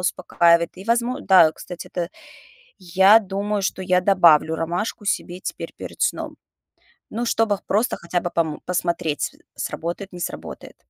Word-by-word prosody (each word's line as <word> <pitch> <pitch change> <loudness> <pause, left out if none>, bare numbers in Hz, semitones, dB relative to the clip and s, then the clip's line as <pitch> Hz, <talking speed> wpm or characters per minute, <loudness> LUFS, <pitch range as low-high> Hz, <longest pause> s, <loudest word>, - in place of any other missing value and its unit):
успокаивает. 170 -2 +2
И 190 - -10
возмо 235 +4 0
да, 180 -5 +6
кстати, 175 +2 -9
это 175 -1 -2 0.7
я 190 +5 +5
думаю, 200 +1 -2
что 190 0 -2
я 180 0 +2
добавлю 170 -4 +4
ромашку 175 +6 -3
себе 180 -2 -2
теперь - - -6
перед - - -7
сном. 475 - -1 0.7
Ну, 235 +3 -3
чтобы 225 -3 +1
просто 220 +5 +1
хотя 175 +1 -2
бы 175 - -3
пом 160 -3 -1
посмотреть, 170 -4 -1 0.2
с - - -4
сработает, 175 +4 -5
не 175 - -8
сработает. 170 - -7
180 Hz, 150 wpm, -22 LUFS, 170-205 Hz, 0.7 s, да